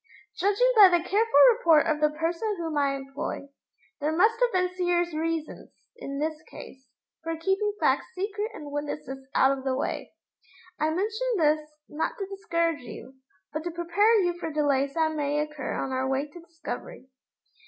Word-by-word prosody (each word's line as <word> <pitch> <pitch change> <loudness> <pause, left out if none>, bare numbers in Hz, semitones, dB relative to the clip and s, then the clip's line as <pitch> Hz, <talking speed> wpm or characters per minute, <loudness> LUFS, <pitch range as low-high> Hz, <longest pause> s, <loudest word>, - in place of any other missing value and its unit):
Judging 410 +7 +2
by 410 -3 +9
the 350 -2 +2
careful 450 +4 +3 0.2
report 330 -10 +4
of 305 -1 0
the 300 - +4
person 335 +7 -2
whom 325 -2 -4
I 280 -1 +1
employ, 275 +1 -6 0.5
there 295 +1 0
must 445 +5 +4
have - - +3
been 365 -1 0
serious 350 -2 0
reasons, 320 0 -3 0.3
in 275 - -6
this 310 +1 -2
case, 260 -2 -12 0.3
for 330 0 -4
keeping 385 +5 0
facts - - +2
secret 410 +3 -3
and 295 -1 -8
witnesses 285 -2 -5
out 270 +1 +4
of 265 - -9
the 265 -1 0
way. 270 - -3 0.7
I 310 - +2
mention 430 +9 -1
this, 310 -2 +3 0.3
not 300 - -3
to 395 - -3
discourage 335 -5 -1
you, 250 +2 -11 0.4
but 310 +1 -3
to 350 - -3
prepare 345 +7 +2
you 350 0 +1
for 325 - -3
delays 280 -2 +1
that 320 -1 +1
may 295 -1 -1
occur 300 -2 -3
on 270 - -3
our 260 0 -1
way 270 +2 0
to 300 +4 -13
discovery. 335 - -8
325 Hz, 175 wpm, -27 LUFS, 290-370 Hz, 0.7 s, by